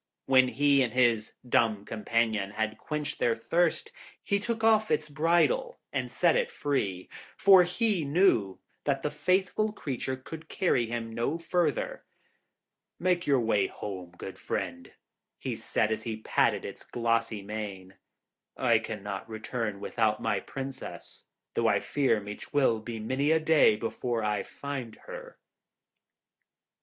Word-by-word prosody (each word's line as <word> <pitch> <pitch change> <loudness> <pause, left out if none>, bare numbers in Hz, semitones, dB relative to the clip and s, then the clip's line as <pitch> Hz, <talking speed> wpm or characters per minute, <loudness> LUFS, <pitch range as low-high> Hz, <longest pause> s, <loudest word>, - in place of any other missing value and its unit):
When 130 -1 +5
he 140 +3 +3
and 120 -3 0
his 120 -4 +2
dumb 110 -4 +2
companion 110 -2 0
had 110 +1 -3
quenched 150 -1 -4
their 115 -1 +2
thirst, 165 +8 0 0.3
he 200 - +1
took 225 +1 -3
off 220 -1 +4
its 150 - +1
bridle 175 - +2
and - - -1
set - - +3
it - - +1
free, 100 -11 -2 0.3
for 195 -2 +8
he 180 0 +1
knew 140 - +3 0.3
that 140 -2 0
the 150 - -1
faithful 185 +7 +1
creature 130 - -3
could 160 +5 -10
carry 130 - +1
him 115 -1 -4
no 120 +8 -1
further. 165 -3 -1 1.0
'Make 180 0 +1
your 135 -3 +4
way 105 -4 +2
home, 90 -4 -7
good - - -8
friend,' - - -4 0.5
he - - -4
said, 110 - 0
as 110 - -1
he 115 -2 -4
patted 110 - +1
its - - -8
glossy 115 -3 -1
mane. 100 -3 -6 0.6
'I 120 -3 +4
cannot 105 -2 -6
return 110 -1 -3
without 110 0 0
my 105 -3 0
Princess, 135 +3 -8 0.3
though - - +1
I - - +3
fear 135 -6 +1
me 105 0 -6
'twill 130 -6 +1
be 115 +1 -6
many 130 +7 0
a 160 0 +4
day 155 -8 +5
before 115 +1 -2
I 105 -1 0
find 135 -5 -6
her.' - - -9
125 Hz, 145 wpm, -29 LUFS, 110-160 Hz, 1.0 s, for